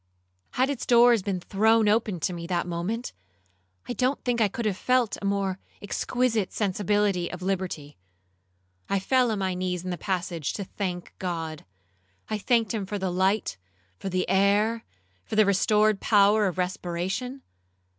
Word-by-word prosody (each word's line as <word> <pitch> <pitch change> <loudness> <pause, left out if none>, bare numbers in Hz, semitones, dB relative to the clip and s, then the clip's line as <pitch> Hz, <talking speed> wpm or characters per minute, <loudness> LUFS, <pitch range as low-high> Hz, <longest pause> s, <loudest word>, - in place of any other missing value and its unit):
Had 260 +3 +2
its 270 - -5
doors 240 -2 +6
been 190 -1 -2
thrown 220 +4 +3
open 210 -3 +1
to 180 - 0
me 170 -1 -6
that 175 -1 0
moment, 180 +8 -3 0.7
I - - -2
don't 255 +4 0
think 240 -2 0
I 215 - +5
could 225 +4 -5
have 210 -3 +1
felt 250 +2 +1
a - - -4
more 195 -1 0 0.2
exquisite 220 0 -1
sensibility 205 -2 0
of 180 0 -7
liberty. 180 -6 -3 0.9
I 200 - +2
fell 250 +5 +2
on 220 - -1
my 190 -1 -1
knees 180 -1 -2
in 185 - -4
the 175 - -4
passage 175 -5 -2
to 200 - -4
thank 180 -2 -5
God. 165 -4 -4 0.7
I 215 - -1
thanked 230 0 +1
him 205 -4 -3
for 205 - -3
the 190 -2 -2
light, 190 - 0 0.4
for 195 - -4
the 185 0 -1
air, 205 +4 +2 0.4
for - - -5
the 215 0 +6
restored 210 +1 +3
power 210 0 +4
of 185 - -3
respiration. 185 +8 -3
200 Hz, 165 wpm, -26 LUFS, 180-220 Hz, 0.9 s, doors